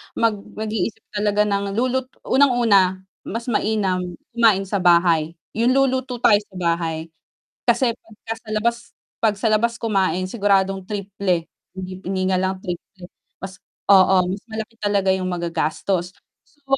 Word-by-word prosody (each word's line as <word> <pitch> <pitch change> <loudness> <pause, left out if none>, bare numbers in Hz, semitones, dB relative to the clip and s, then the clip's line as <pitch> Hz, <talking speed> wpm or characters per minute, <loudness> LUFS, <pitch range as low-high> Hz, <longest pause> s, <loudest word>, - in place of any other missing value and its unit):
mag 230 -1 +3 0.2
mag-iisip 220 0 -3
talaga 210 0 +1
ng 200 -1 -1
lulut 255 +2 0 0.2
unang-una 225 -9 +3 0.2
mas 230 +3 -4
mainam 205 -4 +1 0.3
kumain 225 -5 +4
sa 195 +1 -2
bahay, 170 -2 +3 0.2
yung 240 +4 +2
luluto 260 -2 +1
tayo 205 -2 +6
sa 190 - -20
bahay 165 -2 -2 0.6
kasi 255 -4 +3
pagka 220 +1 -8
sa 220 - -15
labas 235 +2 +1 0.4
'pag 215 -2 +2
sa 220 +3 -1
labas 230 +2 +2
kumain 195 -5 0
siguradong 195 -2 +1
triple, 200 -4 -2 0.3
hindi 185 0 -7
hindi 190 -1 -1
nga 185 - +2
lang 190 0 0
triple 180 0 -8 0.3
mas 190 0 -7 0.3
oo, 190 0 +6 0.2
mas 195 - -5
malaki 220 +1 -6
talaga 200 -2 +1
yung 185 -1 -1
magagastos 175 +1 -2 0.3
so 290 -1 -32
200 Hz, 140 wpm, -21 LUFS, 185-225 Hz, 0.6 s, tayo